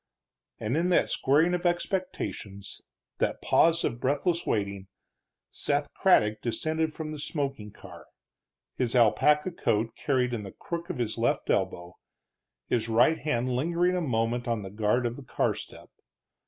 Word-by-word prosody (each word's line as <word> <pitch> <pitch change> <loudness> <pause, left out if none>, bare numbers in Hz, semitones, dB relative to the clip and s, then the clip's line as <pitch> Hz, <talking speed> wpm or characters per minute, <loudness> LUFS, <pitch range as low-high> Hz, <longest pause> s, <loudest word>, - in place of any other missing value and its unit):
And 110 +5 -1
in 170 +3 +1
that 180 - +3
squaring 155 +6 +3
of 180 0 -1
expectation, 175 - -2 0.6
that - - 0
pause 165 0 +3
of 115 - -1
breathless 145 +7 0
waiting, 100 -2 -2 0.6
Seth 145 0 -1
Craddock 110 - +3
descended 155 +6 -1
from 155 0 -6
the 155 - -6
smoking 140 -8 -3
car, 90 -4 -13 0.7
his 125 -1 -1
alpaca 150 - +4
coat 115 -8 0
carried 125 -3 0
in 115 - -2
the 100 -2 -9
crook 170 +1 -5
of 180 - -3
his 115 -2 -2
left 120 +1 +1
elbow, 90 -2 -2 0.7
his 115 -1 0
right 120 +8 +4
hand 130 -4 -1
lingering 175 +6 +1
a 180 - 0
moment 120 -3 -1
on 115 -3 -1
the 95 - -8
guard 110 +4 +1
of 120 0 -2
the 140 - -9
car - - 0
step. - - -11
125 Hz, 155 wpm, -28 LUFS, 110-160 Hz, 0.7 s, alpaca